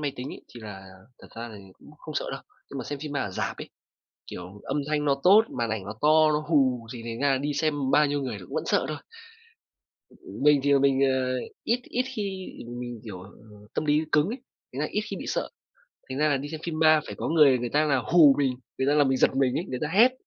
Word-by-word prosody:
máy 145 -2 -2
tính 125 +3 -5
ấy, - - -8
thì 120 - -12
là 100 -3 -9 0.3
thật - - -15
ra 115 +1 -6
thì - - -11 0.2
cũng - - -16
không 155 - -9
sợ - - -2
đâu. 135 - -5 0.3
Nhưng 140 - -6
mà 125 - -5
xem 145 +3 -5
phim 150 0 -6
ma 140 - -1
ở 105 - -3
rạp 95 - -3
ấy, - - -7 0.6
kiểu, 90 +3 -9
âm 145 - -2
thanh 150 -1 0
nó 140 -2 +3
tốt, 200 +4 +7 0.2
màn 115 -1 0
ảnh 110 -3 -3
nó 100 - -5
to, 155 +1 +5
nó 150 0 -1
hù 130 -7 +2
thì 120 - -8
thành 115 0 -5
ra 140 0 +3
là 135 - +2
đi 145 +2 -2
xem 145 -3 0
bao 150 +1 +5
nhiêu 145 0 -1
người 125 -6 -4
cũng 90 - -11
vẫn - - -1
sợ - - +2
thôi. 155 - -3 1.5
Mình 150 -1 +6
thì 140 0 +3
mình, 135 0 +3
à, 130 -1 +1 0.3
ít 240 +2 +1
ít 250 - -1
khi 215 - -1 0.6
mình, 120 -2 -6
kiểu, 95 -5 -8 0.5
tâm - - -1
lý 150 0 +3
cứng 150 +3 +4
ấy, 240 +5 -4 0.3
thành 130 - -5
ra 150 - 0
ít 210 - 0
khi - - -3
bị - - -7
sợ. - - -2 0.6
Thành 130 - -3
ra 155 +1 +3
là 145 - +2
đi 140 +2 -5
xem 160 0 -6
phim 165 -2 -3
ma 155 -1 +5
phải - - -6
có - - -2
người 150 -5 +5
người 120 0 -3
ta 150 +1 +3
là 140 -3 +2
hù 145 +3 +6
mình, 135 -3 +2 0.3
người 130 - 0
ta 145 - +3
làm 145 -2 +4
mình 135 - +2
giật - - +4
mình 135 -2 +2
ấy, 170 - -3
người 125 - -3
ta 150 - 0
hét, 220 +10 +5
140 Hz, 260 wpm, -26 LUFS, 125-150 Hz, 1.5 s, tốt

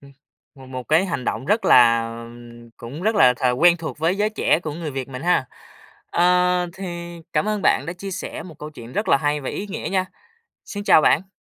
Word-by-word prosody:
ừm, 140 0 -16 0.4
một 135 -2 -14
một 130 -1 -8
cái 160 +5 +3
hành 165 -9 -3
động - - -2
rất 210 +8 +1
là, 115 -2 +6
à, 115 0 -7 0.5
cũng 135 +8 -8
rất 220 +3 +1
là 125 -12 +5
th - - -16 0.2
quen 175 +1 +6
thuộc 160 -2 -7
với 165 +4 +1
giới 210 +1 +1
trẻ 215 - +1
của 155 - -4
người 160 0 -5
Việt 135 -1 -5
mình 130 -1 -7
ha! 175 -6 +2 0.6
Ờ, 180 0 +3
thì, 175 -2 -7
cảm 155 +7 +1
ơn 210 -2 -1
bạn - - +3
đã 175 - -3
chia 195 +2 -7
sẻ 185 - -6
một 165 -4 -12
câu 150 - -8
chuyện 120 -5 -11
rất 210 - -2
là - - +6
hay 145 +1 -1
và 135 - -5
ý 205 - -5
nghĩa 200 - -5
nha. 190 -1 +1 0.6
Xin 205 0 -6
chào 160 - +6
bạn! 175 +7 +2
165 Hz, 230 wpm, -22 LUFS, 135-185 Hz, 0.6 s, là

